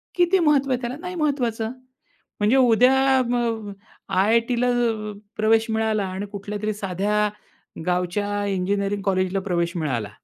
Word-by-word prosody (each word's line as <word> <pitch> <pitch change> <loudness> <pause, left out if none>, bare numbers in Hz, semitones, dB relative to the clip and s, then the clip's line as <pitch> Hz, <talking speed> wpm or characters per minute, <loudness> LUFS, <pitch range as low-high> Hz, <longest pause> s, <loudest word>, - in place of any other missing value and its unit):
किती 355 +2 +3
महत्त्व 290 -5 +3
आहे 250 -1 0
त्याला, 245 +2 -4
नाही 360 0 -6
महत्वाचं. 245 -8 -1 0.7
म्हणजे 210 +4 +3
उद्या 250 +1 +5 0.2
अ, - - +3
अ, 225 -3 -2 0.4
आय-आय-टीला 230 +5 +2
अ, 225 -3 0 0.2
प्रवेश 220 +1 +3
मिळाला 220 -2 0
आणि 190 +2 -4
कुठल्यातरी 210 +1 -4
साध्या 205 +1 0 0.6
गावच्या 205 +3 -1
इंजिनिअरिंग 200 +1 -1
कॉलेजला 185 0 0
प्रवेश 170 -3 -1
मिळाला. 125 -10 -2
215 Hz, 130 wpm, -23 LUFS, 195-240 Hz, 0.7 s, उद्या